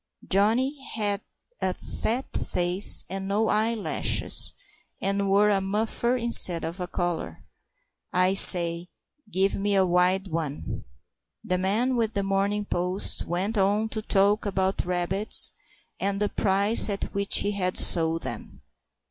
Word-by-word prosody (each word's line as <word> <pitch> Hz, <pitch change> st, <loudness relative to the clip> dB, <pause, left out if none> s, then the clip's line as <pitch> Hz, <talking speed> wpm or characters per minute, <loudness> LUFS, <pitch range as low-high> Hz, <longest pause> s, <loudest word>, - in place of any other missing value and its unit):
Johnny 245 Hz, +8 st, +1 dB
had 205 Hz, -2 st, 0 dB, 0.4 s
a -, -, -2 dB
fat 245 Hz, +4 st, -4 dB
face 180 Hz, +3 st, +3 dB
and 195 Hz, 0 st, -6 dB
no 210 Hz, +3 st, -1 dB
eyelashes, 220 Hz, 0 st, +1 dB, 0.5 s
and 200 Hz, 0 st, -2 dB
wore 205 Hz, +2 st, +3 dB
a 195 Hz, -1 st, 0 dB
muffler 220 Hz, +5 st, -2 dB
instead 230 Hz, -8 st, +4 dB
of 165 Hz, +4 st, -6 dB
a 180 Hz, -, -5 dB
collar. 175 Hz, -2 st, -5 dB, 0.7 s
"I 185 Hz, +1 st, +1 dB
say, 170 Hz, -3 st, +5 dB, 0.4 s
give 195 Hz, +1 st, +1 dB
me 200 Hz, 0 st, -1 dB
a 190 Hz, -1 st, +3 dB
wild 180 Hz, +2 st, +1 dB
one." 155 Hz, -4 st, -6 dB, 0.6 s
The 180 Hz, 0 st, -2 dB
man 220 Hz, +8 st, 0 dB
with 225 Hz, -2 st, -2 dB
The 200 Hz, -, -1 dB
Morning 200 Hz, +1 st, -2 dB
Post 180 Hz, +1 st, -1 dB
went 195 Hz, +5 st, -2 dB
on 205 Hz, +3 st, 0 dB
to 220 Hz, -, -4 dB
talk 205 Hz, 0 st, +1 dB
about 190 Hz, -1 st, -2 dB
rabbits 180 Hz, +3 st, +2 dB, 0.5 s
and 200 Hz, 0 st, -2 dB
the 210 Hz, 0 st, -1 dB
price 200 Hz, +3 st, +1 dB
at 200 Hz, -1 st, -4 dB
which 200 Hz, 0 st, +3 dB
he 205 Hz, -, -1 dB
had 185 Hz, -3 st, -2 dB
sold 165 Hz, -1 st, +3 dB
them. -, -, -9 dB
195 Hz, 140 wpm, -24 LUFS, 180-210 Hz, 0.7 s, say